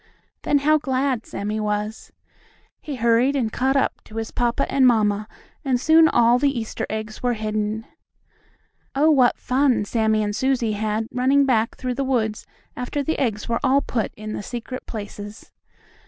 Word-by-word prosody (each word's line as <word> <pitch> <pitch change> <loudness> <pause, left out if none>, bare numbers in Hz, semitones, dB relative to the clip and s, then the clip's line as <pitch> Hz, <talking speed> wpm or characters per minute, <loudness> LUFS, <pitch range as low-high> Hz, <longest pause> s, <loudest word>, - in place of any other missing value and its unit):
Then 290 - +2
how 310 0 +5
glad 265 -3 -1
Sammie 210 +2 -3
was! 210 +1 -3 0.7
He 295 - -6
hurried 235 +3 +2
and 230 -5 -1
caught 265 +2 +1
up 275 - 0
to 215 - -14
his 225 0 -4
papa 240 -1 0
and 265 -2 +4
mamma, 215 -3 +2 0.4
and 260 -3 +1
soon 320 +3 +6
all 240 -3 +4
the 275 -2 +1
Easter 225 - -4
eggs 215 0 -5
were 245 -1 0
hidden. 215 0 -2 1.1
Oh, 305 +3 +4
what 255 -5 +4
fun 255 -4 +1
Sammie 220 0 +1
and 205 0 -2
Susie 255 -3 +1
had 215 +1 -2
running 270 +3 +3
back 230 -4 +1
through 255 -1 -3
the 275 - -2
woods 225 -5 -1 0.3
after 265 +3 -3
the 320 +4 -2
eggs 220 -6 -1
were 235 0 0
all 275 +2 +3
put 225 -3 -2
in 215 0 -6
the - - -4
secret 245 +4 -7
places! 205 -1 -8
235 Hz, 170 wpm, -22 LUFS, 215-265 Hz, 1.1 s, soon